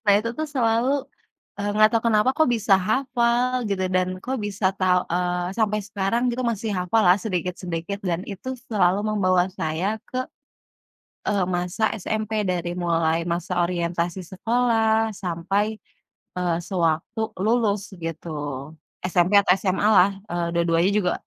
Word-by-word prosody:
Nah, 205 Hz, -, +5 dB
itu 230 Hz, +2 st, -3 dB
tuh 310 Hz, -, 0 dB
selalu, 240 Hz, -2 st, +1 dB, 0.7 s
eee, 205 Hz, -, -1 dB
gak 215 Hz, 0 st, +7 dB
tau 230 Hz, -, +3 dB
kenapa, 220 Hz, +1 st, +4 dB
kok, 315 Hz, -, +4 dB
bisa 210 Hz, -3 st, +4 dB
hafal 245 Hz, +3 st, +1 dB
gitu, 190 Hz, -2 st, -1 dB
dan, 185 Hz, 0 st, +2 dB, 0.2 s
kok 260 Hz, +2 st, -2 dB
bisa 200 Hz, -1 st, -3 dB
tau 180 Hz, -1 st, +3 dB
eee, 180 Hz, +1 st, -1 dB
sampai 210 Hz, -2 st, +1 dB
sekarang 205 Hz, +5 st, 0 dB
gitu 255 Hz, +2 st, -3 dB
masih 225 Hz, -1 st, -1 dB
hafal 180 Hz, +5 st, +2 dB
lah 180 Hz, +2 st, +6 dB
sedikit-sedikit 180 Hz, -1 st, -3 dB
dan 175 Hz, -1 st, -1 dB
itu 210 Hz, +7 st, -5 dB, 0.2 s
selalu 195 Hz, -3 st, +3 dB
membawa 185 Hz, -3 st, +2 dB
saya 180 Hz, +4 st, -2 dB
ke, 255 Hz, -, -2 dB, 1.1 s
eee, 200 Hz, -3 st, +2 dB
masa 180 Hz, +4 st, -1 dB, 0.2 s
SMP, 215 Hz, +1 st, -1 dB
dari 175 Hz, -1 st, -1 dB
mulai 165 Hz, -1 st, +1 dB
masa 175 Hz, +1 st, -1 dB
orientasi 170 Hz, +1 st, -2 dB
sekolah 225 Hz, +1 st, +2 dB
sampai, 195 Hz, +4 st, -1 dB, 0.6 s
eee, 175 Hz, -2 st, 0 dB
sewaktu 175 Hz, +4 st, -1 dB, 0.2 s
lulus 210 Hz, -2 st, +1 dB
gitu. 165 Hz, 0 st, -6 dB, 0.7 s
SMP 180 Hz, +2 st, +3 dB
atau 195 Hz, -, +3 dB
SMA 190 Hz, +1 st, -1 dB
lah, 195 Hz, -2 st, +6 dB, 0.2 s
eee, 175 Hz, -1 st, -1 dB
dua-duanya 170 Hz, +2 st, +2 dB
juga 200 Hz, -3 st, +1 dB
195 Hz, 140 wpm, -24 LUFS, 175-220 Hz, 1.1 s, gak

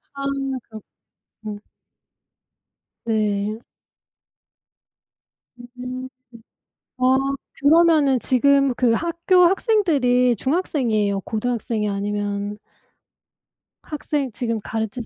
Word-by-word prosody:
아 275 Hz, -, -5 dB
그렇구 270 Hz, -4 st, -4 dB, 0.7 s
음. 205 Hz, -1 st, -6 dB, 1.4 s
네. 215 Hz, -1 st, -1 dB, 2.2 s
음. 255 Hz, +1 st, -6 dB, 0.9 s
아 255 Hz, +1 st, +3 dB, 0.4 s
그러면은 300 Hz, -3 st, +4 dB
지금 275 Hz, +1 st, +3 dB
그 240 Hz, -1 st, +2 dB
학교 340 Hz, +6 st, +2 dB
학생들이 290 Hz, -, +2 dB
중학생이에요, 230 Hz, -, 0 dB
고등학생이에요? 220 Hz, -1 st, -2 dB
아니면 205 Hz, 0 st, -3 dB, 1.3 s
학생 295 Hz, -3 st, -3 dB
지금 230 Hz, 0 st, -2 dB
가르치신 220 Hz, +1 st, -4 dB
250 Hz, 180 characters per minute, -22 LUFS, 215-280 Hz, 2.2 s, 그러면은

